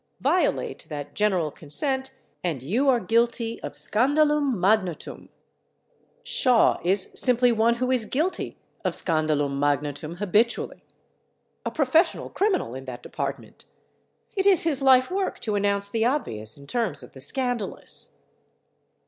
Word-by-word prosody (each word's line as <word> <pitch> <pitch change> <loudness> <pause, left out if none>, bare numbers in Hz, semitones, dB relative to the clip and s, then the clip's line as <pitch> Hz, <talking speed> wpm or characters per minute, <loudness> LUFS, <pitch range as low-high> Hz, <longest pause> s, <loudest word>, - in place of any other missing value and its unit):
Violate - - 0
that 145 -2 -6
general 185 -7 +1
consent 265 - -2 0.3
and 155 -8 -2
you 240 - +1
are 250 -2 +4
guilty 230 +2 0
of - - -6
scandalum 290 +3 +2
magnatum. 185 -3 0 0.9
Shaw 250 -3 +3
is 190 +2 +1
simply 245 -1 +4
one 230 +1 +2
who 255 +2 -1
is 250 -4 +2
guilty 315 - -2 0.3
of - - 0
scandalum 155 -4 0
magnatum 145 +2 -1
habitually, 210 +5 0 0.8
a - - -2
professional 315 +4 +1
criminal 390 - 0
in 130 +1 -8
that 125 -2 -8
department. - - -6 0.7
It 390 0 +1
is 380 -4 +5
his 300 -5 +1
life 260 +2 +5
work 385 0 -2
to 215 - -2
announce 200 0 0
the 225 0 0
obvious 115 - -2
in 140 - -13
terms 220 - -2
of - - -14
the 130 - -12
scandalous. 245 - -3
225 Hz, 130 wpm, -25 LUFS, 160-260 Hz, 0.9 s, is